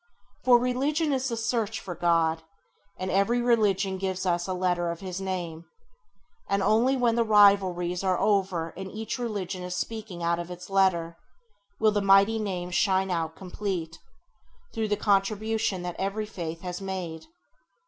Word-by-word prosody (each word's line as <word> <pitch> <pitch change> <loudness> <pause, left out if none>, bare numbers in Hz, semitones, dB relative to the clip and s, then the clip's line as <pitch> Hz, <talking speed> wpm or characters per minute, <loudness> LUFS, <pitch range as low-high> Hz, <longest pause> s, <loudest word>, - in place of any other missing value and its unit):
For 250 -1 +7
religion 280 +5 0
is 265 0 0
the 230 - -3
search 225 -1 -1
for 180 - -6
God, 165 -1 +1 0.6
and 185 0 -3
every 200 +6 +2
religion 205 -5 +2
gives 190 0 -2
us 175 0 0
a 185 - -1
letter 180 -1 0
of 170 +1 -5
His 185 -1 -5
Name; 175 -4 -4 0.8
and 200 0 +1
only 235 +7 +3
when 240 -2 +2
the 235 0 +2
rivalries 195 -4 +4
are 185 -2 +2
over 190 -5 +1
and 190 +1 -6
each 220 +5 -5
religion 200 -6 -3
is 180 0 -4
speaking 210 -5 -5
out 170 0 +1
its 180 +2 -8
letter, 170 -4 +2 0.6
will 215 -1 +4
the 205 -1 0
mighty 200 +3 +5
Name 180 -4 -3
shine 190 +1 +2
out 165 -2 -2
complete, 180 -3 -4 0.7
through 220 -1 -1
the 205 0 0
contribution 210 -1 0
that 175 -1 -5
every 200 +3 -2
faith 170 -5 -6
has 180 0 -5
made. 180 -4 -5
190 Hz, 160 wpm, -27 LUFS, 175-215 Hz, 0.8 s, For